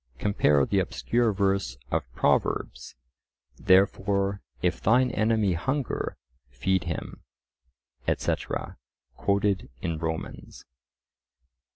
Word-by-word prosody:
(Compare 75 -8 +3
the - - +1
obscure 120 -1 +1
verse 95 - 0
of - - -1
Proverbs, - - 0 0.6
"Therefore 100 +1 +2 0.2
if 90 0 +1
thine 125 +4 +4
enemy 110 -3 +2
hunger, 135 - -2 0.3
feed 90 +10 0
him," 85 -2 -5 0.9
etc., - - -2 0.4
quoted 100 -1 0
in 80 +2 -3
Romans.) 80 -1 -5
100 Hz, 85 wpm, -27 LUFS, 85-105 Hz, 0.9 s, thine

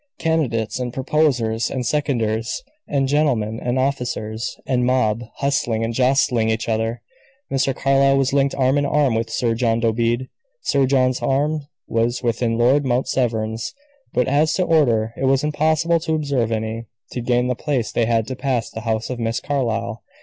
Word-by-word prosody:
Candidates, 130 - 0
and 125 -1 -3
proposers 125 -4 +1
and 130 -2 -3
seconders, 115 -6 -1 0.2
and 135 -2 +1
gentlemen, 125 -7 +1
and 125 +1 -1
officers, 125 -4 -2
and 125 -2 +1
mob, 120 -3 +1
hustling 120 -5 0
and 115 +1 -2
jostling 125 -2 +2
each 110 +1 -1
other. 115 +1 -1 0.5
Mr. 135 -1 +1
Carlyle 135 0 +3
was 135 0 +1
linked 140 -1 +2
arm 135 +1 +2
in 145 - 0
arm 140 -4 +2
with 115 +1 -1
Sir 115 0 0
John 115 0 +1
Dobede; 115 +2 0 0.4
Sir 140 -2 +2
John's 130 -1 +2
arm 145 +2 0 0.2
was 115 +2 0
within 115 -1 0
Lord 130 +5 +4
Mount 130 -1 0
Severn's 110 - -1 0.4
but, 125 - +1
as 150 +4 +2
to 185 +2 +1
order, 120 -10 +2
it 135 - -2
was 135 +1 +3
impossible 155 +2 +2
to 160 -1 -1
observe 140 -7 0
any. 110 +1 -3 0.3
To 125 - -4
gain 120 +1 +1
the 125 - +1
place 125 -3 -2
they 115 - +1
had 115 -2 +2
to 130 - -3
pass 130 -3 -1
the 110 - -6
house 110 +1 -2
of 125 - -4
Miss 115 0 -1
Carlyle. 115 -5 -2
125 Hz, 170 wpm, -21 LUFS, 115-140 Hz, 0.5 s, Lord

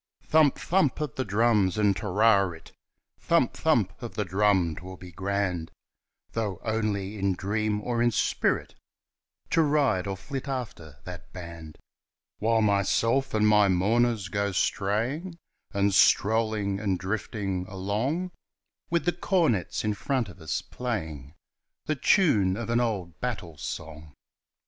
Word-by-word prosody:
Thump! 155 -3 +4
thump! 170 -7 +1
of 150 -5 -3
the 130 - -2
drums 105 -3 +2
and 105 -2 +3
"Te 105 - -5
ri 100 0 +4
rit," 80 -1 -12 0.5
Thump! - - +2
thump! - - +1
of - - -7
the 105 - -1
drum 95 -3 +2
'twill 95 +1 -9
be 90 0 -11
grand, 95 -2 -2 0.6
Though 105 -6 -2
only 105 -2 -2
in 95 -1 +1
dream 105 +2 -1
or 120 +1 -1
in 120 - +4
spirit 115 - 0 0.8
To 165 - +4
ride 145 - +2
or 95 -1 -3
flit 135 +8 -6
after 110 - -5
that 90 -1 -10
band! 85 -3 -9 0.6
While 115 +1 +2
myself 115 +6 +1
and 105 0 +3
my 105 -1 +5
mourners 105 +3 +2
go 100 +2 -1
straying 120 - -1 0.3
And 100 -1 +1
strolling 105 -1 +3
and 100 -3 0
drifting 95 -1 -3
along, 110 - -2 0.6
With 170 0 0
the 175 - +2
cornets 165 - 0
in 105 -1 0
front 125 +1 -1
of 95 -1 -14
us 80 - -2
playing 80 - -5 0.5
The 155 - 0
tune 130 - +3
of 115 0 -4
an 120 - +3
old 100 -8 -2
battle 105 -10 -4
song! 75 0 -7
105 Hz, 140 wpm, -27 LUFS, 95-120 Hz, 0.8 s, my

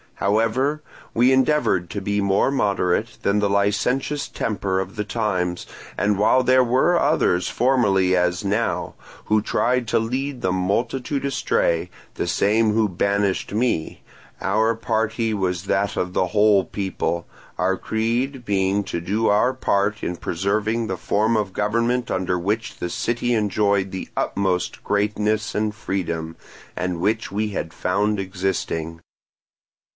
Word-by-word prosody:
However, 115 +9 +1 0.3
we 125 +3 +5
endeavoured 130 - +2
to 100 - -4
be 100 +1 0
more 100 +6 +2
moderate 105 -2 0
than 100 +1 +2
the 100 -1 +1
licentious 105 +8 0
temper 100 -3 -2
of 95 +1 -5
the 105 - -2
times; 95 -5 -2 0.3
and 105 0 +1
while 110 +5 +4
there 130 0 +5
were 130 +8 +3
others, 95 - +2
formerly 100 -8 +2
as 90 +2 +1
now, 105 +4 -1 0.3
who 110 0 +2
tried 125 +3 0
to - - +3
lead 130 +3 -3
the 95 - +1
multitude 120 +9 -1
astray—the 90 -10 -1
same 110 +2 +2
who 110 0 +3
banished 100 +1 0
me—our 110 +1 -1
party 115 0 -1
was 90 -3 -1
that 100 +1 0
of 90 0 -2
the 90 - +1
whole 105 0 +4
people, 95 -3 -3 0.3
our 95 +1 +1
creed 120 +5 -2
being 100 0 +1
to 85 - -3
do 105 +6 0
our 105 +5 +3
part 100 -4 0
in 90 - -2
preserving 105 +7 -1
the 95 -4 -3
form 110 +5 +1
of 105 -3 -1
government 115 +4 0
under 95 -1 0
which 105 +6 -2
the 90 - -3
city 120 +5 -1
enjoyed 100 -3 +1
the 95 0 -6
utmost 95 -3 -1
greatness 105 +1 0
and 105 0 0
freedom, 85 -6 -3 0.4
and 90 -1 -2
which 110 +4 0
we 105 +1 -1
had 90 -5 -4
found 105 +3 0
existing. 90 -4 -3
105 Hz, 140 wpm, -22 LUFS, 95-115 Hz, 0.4 s, we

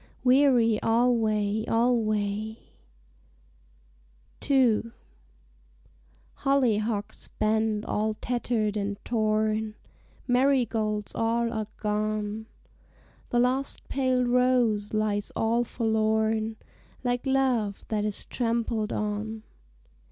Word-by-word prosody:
Weary 250 -4 +4
alway, 220 -3 +2
alway!_" 220 -2 0 1.9
II 235 -4 +3 1.5
Hollyhocks 225 -6 0
bend 220 0 +1
all 215 +1 -1
tattered 235 -3 -1
and 205 -1 -2
torn, 215 -1 0 0.5
Marigolds 235 -5 +1
all 230 +1 0
are 215 -2 -3
gone; 215 0 -2 0.8
The 240 - 0
last 255 +3 0
pale 255 -2 +1
rose 245 -4 +2
lies 210 -1 -1
all 230 +2 +1
forlorn, 220 -1 0 0.5
Like 245 +1 -1
love 255 -7 +1
that 210 -2 0
is 210 -1 -2
trampled 230 -2 -1
on. 215 +1 -3
220 Hz, 80 wpm, -27 LUFS, 215-245 Hz, 1.9 s, Weary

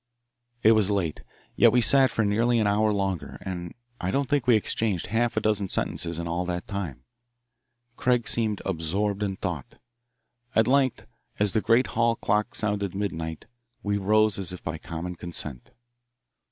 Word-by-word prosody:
It 110 - +7
was 110 -3 +4
late, 95 -7 -1 0.3
yet - - +6
we 125 - +4
sat 135 +2 +5
for 110 -1 0
nearly 115 +4 +2
an 110 - +2
hour 105 +1 +2
longer, 95 -4 -2
and 90 -2 -6 0.2
I 90 - -2
don't 140 +6 0
think 145 -4 0
we 120 - +6
exchanged 105 -3 0
a - - -9
half 120 +1 +1
dozen 105 -2 +1
sentences 85 -2 -1
in 85 0 -4
all 85 +2 -1
that 90 0 -3
time. 100 -9 -5 0.9
Craig 125 -2 +1
seemed 110 -3 0
absorbed 95 +4 -1
in 100 -2 -1
thought. 90 -9 -5 0.8
At 110 - +5
length, 135 0 +2 0.3
as 105 -2 +2
the 110 - +2
great 115 +4 +4
hall 115 0 +2
clock 105 -1 0
sounded 100 -3 -1
midnight, 80 -5 -4 0.4
we 100 0 0
rose 105 +1 +3
as 95 -3 -3
if 90 - -9
by 80 0 -4
common 85 +2 -6
consent. 80 -7 -4
100 Hz, 165 wpm, -26 LUFS, 90-110 Hz, 0.9 s, It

